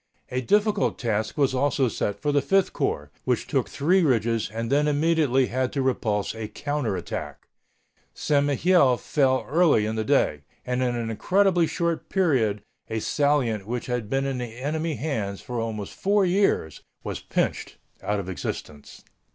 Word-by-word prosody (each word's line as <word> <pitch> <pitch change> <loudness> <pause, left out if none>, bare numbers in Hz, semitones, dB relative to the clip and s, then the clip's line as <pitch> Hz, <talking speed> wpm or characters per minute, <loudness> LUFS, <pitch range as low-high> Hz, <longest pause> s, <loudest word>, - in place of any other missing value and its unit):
A 125 0 -1
difficult 205 - +2
task 110 -2 -2
was 140 -3 +2
also 135 0 +1
set 105 -2 -2
for 150 - 0
the 145 0 +3
Fifth 195 +8 +2
Corps, 75 0 -2
which - - 0
took - - -1
three 180 +7 +2
ridges 115 - +1
and 115 +2 -4
then 145 +2 +3
immediately 150 -3 +2
had 130 +1 -1
to 135 - 0
repulse 110 -6 0
a 110 -1 -5
counter 140 -3 -2
attack. 85 -1 -6 0.7
St. 145 -1 +1
Mihiel 145 -2 +3
fell 130 -2 +1
early 155 -7 +3
in 110 - -2
the 110 - 0
day. 110 - +2 0.2
And 125 0 -1
in 125 -1 0
an 115 -1 -3
incredibly 180 - +2
short 170 -1 -2
period 125 - +1 0.3
a 110 - -1
salient 125 -7 +1
which 120 +1 -3
had 125 -4 -3
been 135 +1 0
in 135 -2 -2
the 120 -2 -6
enemy 155 +4 -2
hands 110 -11 -3
for 120 -1 -5
almost 110 -3 -4
four 200 0 +2
years 180 - +1 0.2
was - - -4
pinched - - -2 0.2
out 105 0 -1
of 95 - -5
existence. 75 -5 -6
130 Hz, 165 wpm, -25 LUFS, 110-150 Hz, 0.7 s, the